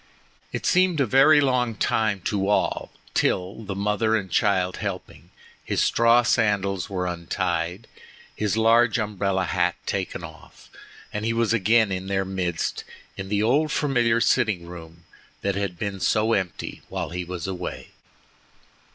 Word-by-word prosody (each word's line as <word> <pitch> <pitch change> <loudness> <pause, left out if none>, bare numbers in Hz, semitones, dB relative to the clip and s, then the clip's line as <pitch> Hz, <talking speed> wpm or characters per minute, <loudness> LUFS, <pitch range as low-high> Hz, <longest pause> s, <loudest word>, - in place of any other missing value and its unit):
It - - -4
seemed 185 -3 +3
a 135 - +3
very 135 +6 +6
long 125 -4 +1
time 105 -2 0
to 100 0 -1
all 105 - 0 0.2
till—the 100 +2 -1
mother 105 +2 +1
and 95 -4 -3
child 95 -3 +1
helping—his - - -6
straw 115 +1 +4
sandals 100 -5 +1
were 90 -2 -2
untied, 90 +2 -2 0.5
his 105 0 -1
large 115 0 +4
umbrella 100 -3 -1
hat - - 0
taken - - -3
off, - - -13 0.4
and 105 - -3
he 115 +1 0
was 115 -1 +1
again 110 0 +3
in 95 0 -3
their 95 0 0
midst 90 -3 -2 0.3
in 95 0 -6
the 105 0 +1
old 145 +7 +2
familiar 120 -6 +2
sitting 105 -6 +1
room 85 -1 -11 0.4
that 100 - 0
had 100 -3 -3
been 100 +1 -4
so 110 +4 +2
empty 95 -4 -3
while - - -4
he 90 +1 -3
was 90 -1 -6
away. 90 -2 -5
100 Hz, 145 wpm, -24 LUFS, 95-115 Hz, 0.5 s, very